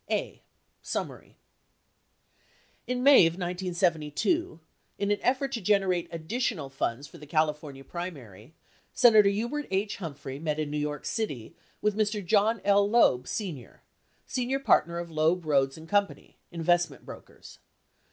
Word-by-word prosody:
A. - - -2 0.4
Summary - - -6 1.5
In 250 0 -2
May 275 -11 +8
of 165 - -2
1972, 175 - -1 0.4
in 200 0 -1
an 205 - +1
effort 270 +2 0
to 235 -4 -3
generate 190 -3 +1
additional 165 - -3
funds 135 0 -3
for - - -14
the 150 - -12
California 150 -3 -1
primary, 140 - -8 0.4
Senator 215 -4 +6
Hubert 235 +9 -2
H. 195 +2 -1
Humphrey 140 -6 -7
met 155 -1 -2
in 155 -2 -3
New 150 - -2
York 150 -1 -4
City 145 - -4 0.3
with 210 -1 +1
Mr. 210 -2 -1
John 210 +3 +2
L. 200 0 +4
Loeb, 130 - +3
Sr., 170 - -6 0.4
senior 255 +1 -1
partner 170 - +2
of 170 -1 -6
Loeb, 160 +3 +1
Rhoades, 135 -2 +1
and 160 0 -12
Co. 205 +2 +3 0.4
(investment 175 +1 0
brokers) - - -13
175 Hz, 135 wpm, -28 LUFS, 150-210 Hz, 1.5 s, May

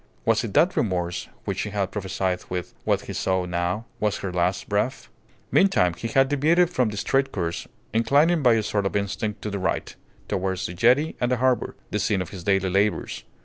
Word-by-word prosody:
Was - - +3
it - - -5
that - - +4
remorse 90 -4 -1 0.2
which - - -2
she 105 - -2
had 100 -2 -2
prophesied 95 -2 -2
with, 90 -1 -4
what - - +2
he - - -7
saw 95 -1 0
now, 90 +5 -2
was 105 -1 0
her 95 -2 -5
last 90 +2 0
breath? 105 +6 -1 0.4
Meantime, 185 - +4
he 115 - -4
had 135 +4 +3
deviated 160 +5 +3
from 125 -9 +1
the 105 - -6
straight 135 +5 +1
course, 85 -3 -3 0.3
inclining 145 +9 +3
by 125 -4 +5
a 110 - +1
sort 100 -1 0
of - - -5
instinct 100 +1 -2
to 105 - -3
the 100 - -3
right, 95 +1 -2 0.3
towards 95 0 -1
the 90 - -4
jetty 125 - +3
and 120 0 +1
the 125 - +2
harbour, 130 0 +1 0.2
the 105 - 0
scene 100 0 +1
of 90 - -4
his 95 -4 -8
daily 95 -1 +1
labours. 95 - 0
100 Hz, 205 wpm, -24 LUFS, 95-125 Hz, 0.4 s, by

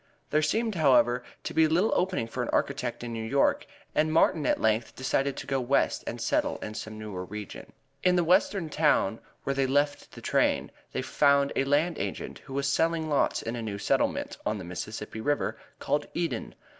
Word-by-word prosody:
There 155 - +3
seemed, 220 +9 +1
however, 125 -7 +4 0.2
to - - -4
be 160 0 +5
little 175 +8 +2
opening 180 -9 0
for 125 +2 -4
an 120 - -2
architect 125 -4 -1
in 120 -1 -5
New 115 -1 -3
York, 135 +5 +2 0.3
and 155 +1 +2
Martin 160 -1 +3
at - - +2
length 110 +1 +1
decided 135 +1 0
to - - -5
go 135 -1 0
West 130 +3 +1
and - - -4
settle - - 0
in 105 - -6
some 110 0 -6
newer 105 -4 -5
region. 105 +2 -8 0.3
In 180 0 +4
the 175 - +3
western 185 +1 +2
town 150 -9 +2 0.2
where 140 - 0
they 135 -1 +1
left 145 +2 0
the - - -10
train - - +1 0.2
they - - -2
found 140 -1 +3
a 135 - +2
land 150 +4 +1
agent - - -4
who 135 - -11
was 140 0 0
selling 160 +2 +1
lots 145 - +1
in 115 +1 -3
a 120 - -4
new 105 -3 -4
settlement, 100 - 0
on 105 - -1
the 95 - -7
Mississippi 105 +5 -6
River, 145 +4 -1 0.2
called - - -1
Eden. - - -2
140 Hz, 195 wpm, -28 LUFS, 115-155 Hz, 0.3 s, be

